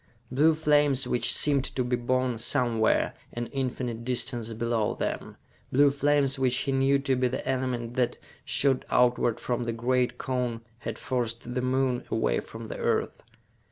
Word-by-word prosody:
Blue 155 Hz, +5 st, +4 dB
flames 145 Hz, -3 st, +3 dB
which 125 Hz, -, +2 dB
seemed 140 Hz, -3 st, +3 dB
to 130 Hz, -, -1 dB
be 125 Hz, 0 st, 0 dB
born 125 Hz, 0 st, 0 dB
somewhere, 115 Hz, -2 st, +1 dB, 0.2 s
an 120 Hz, 0 st, -3 dB
infinite 125 Hz, -3 st, -3 dB
distance 120 Hz, -2 st, -2 dB
below 115 Hz, -1 st, -1 dB
them; -, -, -4 dB, 0.3 s
blue 140 Hz, +2 st, +5 dB
flames 140 Hz, -1 st, +1 dB
which 125 Hz, -1 st, +2 dB
he 140 Hz, -, -1 dB
knew 135 Hz, +1 st, +3 dB
to 135 Hz, -1 st, 0 dB
be 125 Hz, 0 st, +2 dB
the 130 Hz, +1 st, -4 dB
element 125 Hz, -3 st, -2 dB
that, 125 Hz, -1 st, 0 dB, 0.3 s
shot 135 Hz, -2 st, +2 dB
outward 125 Hz, -2 st, +2 dB
from 120 Hz, -1 st, -2 dB
the 115 Hz, -, -2 dB
great 125 Hz, +1 st, 0 dB
cone, 125 Hz, -3 st, -2 dB, 0.2 s
had 115 Hz, -2 st, -5 dB
forced 120 Hz, -4 st, -3 dB
the 125 Hz, -, -1 dB
Moon 130 Hz, -1 st, 0 dB
away -, -, +1 dB
from -, -, -9 dB
the -, -, -6 dB
Earth. -, -, -1 dB
125 Hz, 160 wpm, -27 LUFS, 120-135 Hz, 0.3 s, blue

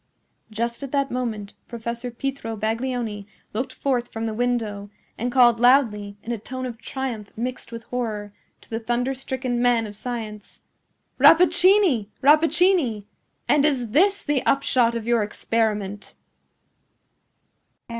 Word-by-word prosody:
Just 235 Hz, +3 st, -3 dB
at 275 Hz, -2 st, -6 dB
that 275 Hz, -1 st, 0 dB
moment 220 Hz, -5 st, -3 dB
Professor 235 Hz, +1 st, -5 dB
Pietro 240 Hz, -2 st, -4 dB
Baglioni 225 Hz, -1 st, -3 dB, 0.3 s
looked 245 Hz, +5 st, -3 dB
forth 250 Hz, -3 st, -2 dB
from 225 Hz, 0 st, -4 dB
the 220 Hz, -, -2 dB
window, 220 Hz, -4 st, -2 dB, 0.3 s
and 245 Hz, +2 st, -3 dB
called 240 Hz, -2 st, +5 dB
loudly, 225 Hz, -5 st, +3 dB
in 235 Hz, -, -5 dB
a 235 Hz, -, -3 dB
tone 255 Hz, +4 st, -6 dB
of 235 Hz, -3 st, -6 dB
triumph 240 Hz, -5 st, -5 dB
mixed 250 Hz, +1 st, -5 dB
with 230 Hz, 0 st, -7 dB
horror, 215 Hz, -5 st, -4 dB, 0.3 s
to -, -, -21 dB
the 225 Hz, -, -2 dB
thunderstricken 245 Hz, +1 st, -2 dB
man 240 Hz, -2 st, +3 dB
of 210 Hz, -1 st, -8 dB
science, 215 Hz, -2 st, -7 dB, 0.6 s
"Rappaccini! 345 Hz, -, +5 dB, 0.2 s
Rappaccini! 305 Hz, -, +3 dB, 0.4 s
and 295 Hz, -1 st, +4 dB
is 265 Hz, -6 st, +1 dB
this 390 Hz, -, +3 dB
the 290 Hz, -3 st, 0 dB
upshot 255 Hz, -4 st, +2 dB
of 230 Hz, -2 st, -4 dB
your 235 Hz, -1 st, +2 dB
experiment!" 210 Hz, -1 st, -2 dB
240 Hz, 130 wpm, -23 LUFS, 220-265 Hz, 0.6 s, called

